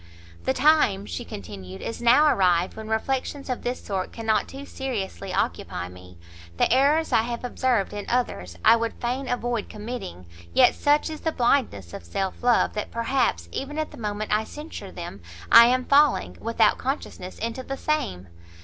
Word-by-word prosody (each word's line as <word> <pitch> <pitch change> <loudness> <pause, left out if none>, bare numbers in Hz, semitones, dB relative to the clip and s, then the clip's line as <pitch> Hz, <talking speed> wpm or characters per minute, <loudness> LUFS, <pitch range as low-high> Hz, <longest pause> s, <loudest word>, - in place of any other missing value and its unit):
"The 130 - +2
time," 295 - +3
she 85 -4 -5
continued, 95 +1 -9
"is 230 - -5
now 240 +6 +6
arrived 180 - +3
when 220 0 -8
reflections 265 +5 -2
of 250 - -3
this 245 +1 -3
sort 190 -2 -3
cannot 225 -1 0
too 275 +1 -9
seriously 235 - -4
occupy 90 0 -2
me; 90 0 -14 0.4
the - - +3
errors 290 +5 +3
I - - +5
have 235 +1 -4
observed 245 -5 0
in 205 -1 -6
others, 90 - -1
I 230 - +8
would 230 0 -2
fain 255 +3 -2
avoid 240 -3 -2
committing; 210 - -7 0.3
yet - - +6
such 295 +2 +2
is 310 - -7
the 320 - 0
blindness 235 - 0
of - - -7
self 185 - -3
love, 245 -1 +3
that 210 - -4
perhaps, 230 - 0
even 290 +2 -5
at 310 -1 -2
the - - -12
moment 210 -1 -3
I 215 +1 +2
censure 300 +7 -8
them, - - -8 0.3
I 235 0 +10
am 255 +1 +1
falling, 290 0 +3
without 225 -1 +2
consciousness, 255 -8 -4
into 230 +3 -3
the 270 +1 -5
same! 95 - -2
230 Hz, 175 wpm, -25 LUFS, 190-265 Hz, 0.4 s, I